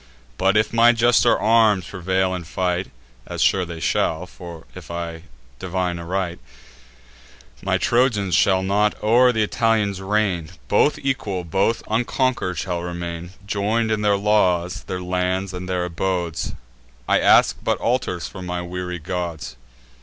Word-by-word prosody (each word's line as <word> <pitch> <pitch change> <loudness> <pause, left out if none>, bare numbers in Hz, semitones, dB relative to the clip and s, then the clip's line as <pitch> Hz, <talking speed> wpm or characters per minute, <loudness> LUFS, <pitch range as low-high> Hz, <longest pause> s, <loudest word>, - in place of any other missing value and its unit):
But, 95 +2 +3
if 110 +1 +1
my 115 +1 +6
juster 120 0 +4
arms 110 -5 +4
prevail 95 0 -1
in 90 -1 -4
fight, 90 +2 -2 0.4
(As - - -6
sure 95 -2 +3
they 85 -1 -7
shall, 80 +2 0 0.5
if 90 -4 -11
I 85 -1 -5 0.3
divine 90 -1 -2
aright,) 90 0 -3 1.2
My - - +1
Trojans 115 -7 +1
shall 95 +2 +3
not 105 +2 +1
o'er 120 +4 +5
th' 115 - -5
Italians 105 -3 +1
reign: 95 -5 0 0.2
Both 145 +8 +3
equal, 100 -9 -2
both 95 +7 0
unconquer'd 120 - 0
shall 90 0 -2
remain, 85 0 -6
Join'd 110 +3 0
in 110 -1 0
their 105 -1 +3
laws, 90 -4 +1
their 90 -1 -4
lands, 90 +1 -1
and 90 0 -6
their 90 -1 0
abodes; 85 -1 -2 0.5
I - - +3
ask - - +5
but - - +1
altars 115 -10 -1
for 95 - -10
my 90 0 -4
weary 90 0 -5
gods. 85 -5 -5
95 Hz, 140 wpm, -22 LUFS, 90-105 Hz, 1.2 s, my